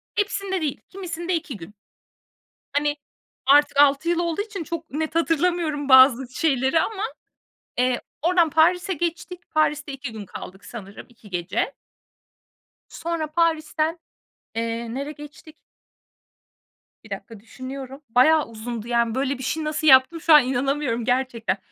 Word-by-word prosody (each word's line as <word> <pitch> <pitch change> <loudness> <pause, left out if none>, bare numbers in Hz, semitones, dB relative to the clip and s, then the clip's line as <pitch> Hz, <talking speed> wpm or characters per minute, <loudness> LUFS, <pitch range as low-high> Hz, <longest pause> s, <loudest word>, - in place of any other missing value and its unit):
Hepsinde 395 -3 -1
değil. 295 -3 -2
Kimisinde 355 -2 -3
2 310 -8 -4
gün. 195 +4 -12 1.0
Hani, 290 +1 0 0.5
artık 290 +1 +5
6 285 +3 +4
yıl 345 0 +1
olduğu 340 +2 -1
için 410 -4 -6
çok 330 0 -6
net 315 +3 -3
hatırlamıyorum 330 -3 0
bazı 260 -1 +7
şeyleri 270 -1 +2
ama, 410 +4 -2 0.7
eee, 250 0 +1 0.2
oradan 340 0 +3
Paris'e 355 +5 +3
geçtik. 345 +2 -4
Paris'te 300 -1 0
2 270 -3 -6
gün 215 -2 -7
kaldık 190 +1 -10
sanırım, 205 -4 -9
2 225 -3 -17
gece. 185 +9 -2 1.2
Sonra 330 -2 -3
Paris'ten, 325 0 0 0.6
eee, 230 0 -3
nereye 280 +3 -4
geçtik? 295 +2 -13 1.5
1 220 - -15
dakika. 200 +2 -7
Düşünüyorum. 260 +4 -8
Bayağı 295 +7 +5
uzundu, 230 0 -6
yani, 235 -1 +1
böyle 270 0 0
bir 260 - -7
şeyi 315 +5 -2
nasıl 305 0 -1
yaptım 265 +5 +6
şu 325 - +5
an 300 -4 +9
inanamıyorum 260 -2 -1
gerçekten. 245 -4 0
290 Hz, 135 wpm, -23 LUFS, 245-330 Hz, 1.5 s, an